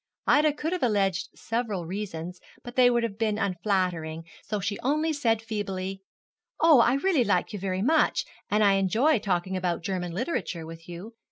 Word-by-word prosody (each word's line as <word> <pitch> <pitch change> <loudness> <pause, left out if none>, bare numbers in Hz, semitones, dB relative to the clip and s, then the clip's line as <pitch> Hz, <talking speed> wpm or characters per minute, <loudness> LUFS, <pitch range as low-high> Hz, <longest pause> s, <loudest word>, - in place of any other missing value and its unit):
Ida 300 0 +4
could 315 +4 -3
have 365 - -2
alleged 195 -5 +1
several 220 -6 -3
reasons, 180 -2 -5 0.2
but 240 0 -9
they 250 -1 +6
would 240 -1 +1
have 220 -2 -4
been 215 -2 +1
unflattering, 180 -5 -1 0.2
so 210 - -3
she 200 +1 -3
only 305 +4 +1
said 225 -6 +1
feebly, 195 -3 -4 0.6
'Oh, 320 -5 +7
I 240 +2 +4
really 305 -2 +2
like 180 -2 0
you 205 - -4
very 190 0 -2
much, 315 +6 +2 0.2
and 210 +1 +3
I 200 -1 +5
enjoy 225 - +3
talking 190 -1 -1
about 180 -2 -1
German 180 -1 -3
literature 185 - -3
with 165 +1 -11
you. 180 +7 -8
205 Hz, 175 wpm, -27 LUFS, 185-240 Hz, 0.6 s, Oh